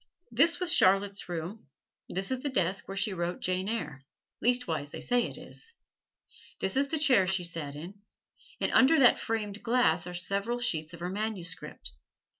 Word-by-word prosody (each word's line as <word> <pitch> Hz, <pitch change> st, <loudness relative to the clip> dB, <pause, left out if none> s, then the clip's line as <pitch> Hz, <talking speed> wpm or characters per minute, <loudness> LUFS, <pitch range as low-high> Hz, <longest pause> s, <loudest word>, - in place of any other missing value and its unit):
This 335 Hz, 0 st, +4 dB
was 360 Hz, -2 st, +2 dB
Charlotte's 195 Hz, 0 st, +3 dB
room; 175 Hz, +3 st, -5 dB, 0.4 s
this 190 Hz, +5 st, -2 dB
is 260 Hz, -, 0 dB
the 285 Hz, -, -3 dB
desk 190 Hz, -6 st, -1 dB
where 195 Hz, -, -6 dB
she 200 Hz, +1 st, +1 dB
wrote 175 Hz, 0 st, -3 dB
"Jane 185 Hz, +2 st, -1 dB
Eyre" 155 Hz, -12 st, -4 dB, 0.4 s
leastwise 200 Hz, -, 0 dB
they -, -, -8 dB
say 245 Hz, -1 st, +1 dB
it -, -, -9 dB
is. 460 Hz, +1 st, -11 dB, 0.9 s
This 190 Hz, -, -1 dB
is 275 Hz, +1 st, +3 dB
the 315 Hz, -, -1 dB
chair 260 Hz, -11 st, +4 dB
she 190 Hz, -1 st, +1 dB
sat 165 Hz, -4 st, -4 dB
in, 180 Hz, +7 st, -9 dB, 0.6 s
and -, -, 0 dB
under 270 Hz, +5 st, +6 dB
that 255 Hz, -5 st, +6 dB
framed 215 Hz, -2 st, -3 dB
glass 225 Hz, -9 st, +2 dB
are 180 Hz, -, -6 dB
several 200 Hz, +6 st, -2 dB
sheets 165 Hz, -9 st, -2 dB
of 170 Hz, -, -14 dB
her 175 Hz, -, -2 dB
manuscript. 200 Hz, -4 st, -4 dB
195 Hz, 175 wpm, -29 LUFS, 175-240 Hz, 0.9 s, under